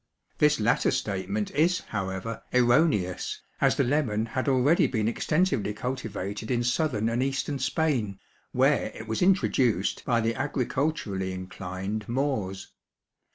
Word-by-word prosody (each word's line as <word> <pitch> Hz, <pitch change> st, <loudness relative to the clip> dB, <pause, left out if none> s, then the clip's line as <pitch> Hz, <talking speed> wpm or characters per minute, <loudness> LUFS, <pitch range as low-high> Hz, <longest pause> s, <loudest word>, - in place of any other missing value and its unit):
This 150 Hz, -1 st, +4 dB
latter 110 Hz, +2 st, +2 dB
statement 100 Hz, +1 st, -2 dB
is, 170 Hz, +5 st, +2 dB
however, 95 Hz, +2 st, -4 dB
erroneous 120 Hz, -, +2 dB, 0.2 s
as -, -, +3 dB
the -, -, +2 dB
lemon 120 Hz, -6 st, +1 dB
had 130 Hz, +4 st, -2 dB
already 135 Hz, +5 st, +4 dB
been 110 Hz, -4 st, -1 dB
extensively 135 Hz, -, 0 dB
cultivated 110 Hz, -4 st, -4 dB
in 120 Hz, -1 st, +1 dB
southern 120 Hz, -3 st, +1 dB
and 115 Hz, +2 st, 0 dB
eastern 135 Hz, +1 st, -1 dB
Spain, 130 Hz, -, 0 dB, 0.3 s
where -, -, +3 dB
it 110 Hz, -, -8 dB
was 110 Hz, 0 st, -2 dB
introduced 130 Hz, -, +2 dB
by 120 Hz, -2 st, +2 dB
the 115 Hz, 0 st, +1 dB
agriculturally 130 Hz, -7 st, -1 dB
inclined 95 Hz, +3 st, -5 dB
Moors. 120 Hz, -8 st, -2 dB
115 Hz, 125 wpm, -27 LUFS, 105-135 Hz, 0.3 s, This